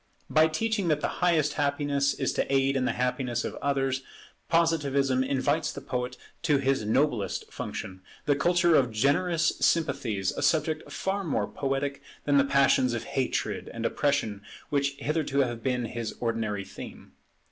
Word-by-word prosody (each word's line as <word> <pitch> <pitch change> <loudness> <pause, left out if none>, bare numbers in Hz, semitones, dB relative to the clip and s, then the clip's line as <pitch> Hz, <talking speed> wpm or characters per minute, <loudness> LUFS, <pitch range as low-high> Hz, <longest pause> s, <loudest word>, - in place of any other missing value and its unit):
By 155 +1 +5
teaching 205 +4 -1
that 150 -2 +1
the - - +1
highest 160 -4 +3
happiness 145 -1 +1
is - - -1
to - - -1
aid 135 0 +2
in 130 -1 +1
the - - +1
happiness 125 -1 -1
of - - -3
others, 135 -2 0 0.5
Positivism 140 -6 +2
invites 140 +3 0
the - - -7
poet 125 -2 -4 0.2
to 150 -4 +3
his 135 -3 +1
noblest 115 -1 0
function, 95 0 -6 0.2
the 145 - +3
culture 175 +3 +3
of 130 -5 +4
generous 155 +8 +2
sympathies, 125 - +1
a - - -5
subject 155 0 +1
far 195 +1 -2
more 160 - 0
poetic 140 0 -2 0.2
than 145 -1 +3
the - - +5
passions 135 -3 +3
of 115 - -3
hatred 130 -1 -1
and - - -5
oppression 140 -8 0 0.3
which 140 -1 +1
hitherto 145 -1 0
have 120 -3 -2
been 125 0 0
his 115 0 -5
ordinary 110 -4 -2
theme. - - -10
140 Hz, 160 wpm, -28 LUFS, 125-155 Hz, 0.5 s, By